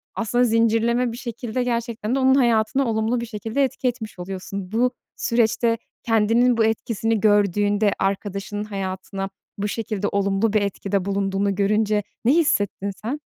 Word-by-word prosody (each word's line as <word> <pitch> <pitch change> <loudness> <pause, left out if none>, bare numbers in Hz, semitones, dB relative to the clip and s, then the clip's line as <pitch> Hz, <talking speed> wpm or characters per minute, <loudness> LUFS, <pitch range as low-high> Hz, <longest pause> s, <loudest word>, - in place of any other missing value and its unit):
aslında 240 +2 +1
zincirleme 230 +1 +2
bir 230 - -7
şekilde 240 0 -3
gerçekten 235 -1 -2
de - - +1
onun 265 0 +5
hayatına 240 +1 +2
olumlu 220 +2 0
bir - - -3
şekilde 225 +4 -2
etki 265 0 -1
etmiş 225 -6 -4
oluyorsun. 190 +1 -6
Bu 245 +3 +2 0.2
süreçte 230 0 +1 0.3
kendinin 230 +2 +3
bu 225 - +4
etkisini 225 0 0
gördüğünde, 205 0 +3
arkadaşının 200 +1 -2
hayatına 195 -1 -4 0.3
bu 205 +1 -1
şekilde 210 -2 -2
olumlu 200 +2 +1
bir 215 - +3
etkide 200 -1 -1
bulunduğunu 195 0 0
görünce 210 +1 +1 0.2
ne 255 - +5
hissettin 205 - +1
sen? 260 +8 -3
220 Hz, 145 wpm, -23 LUFS, 200-235 Hz, 0.3 s, onun